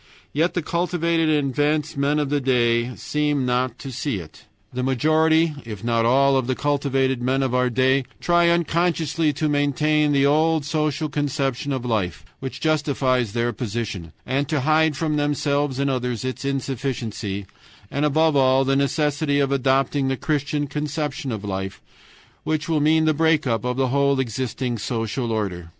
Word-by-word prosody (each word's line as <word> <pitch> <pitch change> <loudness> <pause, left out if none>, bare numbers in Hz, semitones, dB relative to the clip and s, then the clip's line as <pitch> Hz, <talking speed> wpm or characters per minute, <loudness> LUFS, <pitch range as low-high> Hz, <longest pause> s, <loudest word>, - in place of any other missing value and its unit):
Yet 160 +5 +1
the 175 - -1
cultivated 170 -1 0
and 145 -3 +1
advanced 150 +3 0
men 140 +2 +1
of 145 -2 0
the 145 -1 +1
day 120 -2 +1
seem 150 -3 -1
not 125 -1 0
to 135 - -8
see 135 -1 -2
it. 80 -4 -11 0.3
The 125 - -2
majority, 155 +5 +2
if 110 -3 -8
not 115 -1 +1
all, 135 +2 +4
of 130 -2 0
the 130 - 0
cultivated 135 -3 0
men 130 +2 +1
of 130 -2 -1
our 125 0 +2
day 130 +2 +2
try 175 0 +3
unconsciously 165 -2 +1
to 155 - -1
maintain 150 +1 +2
the 140 -1 +3
old 155 +1 +2
social 155 0 -1
conception 140 -2 -2
of 130 -2 -3
life, 105 -8 -2
which 130 -1 -6
justifies 135 -7 +1
their 120 0 0
position, 105 -7 -4
and 135 +2 -1
to 150 -4 0
hide 155 +1 +2
from 155 -1 0
themselves 145 -1 0
and 140 0 0
others 125 -2 -2
its 130 +1 -4
insufficiency, 125 -7 -3 0.5
and 140 - -1
above 155 +1 +3
all 135 0 +4
the 135 +1 +2
necessity 145 +1 +1
of 140 -1 +1
adopting 135 +1 +1
the 135 0 -1
Christian 145 0 -1
conception 150 -1 -3
of 110 -3 -4
life, 95 -1 -4 0.6
which 155 -1 -1
will 160 -3 +1
mean 160 +1 +3
the 155 - +3
break 160 0 +2
up 115 -5 0
of 125 0 -2
the 135 -1 +1
whole 140 +1 +2
existing 125 0 -2
social 115 +2 -2
order. 95 -6 -3
140 Hz, 170 wpm, -22 LUFS, 125-150 Hz, 0.6 s, all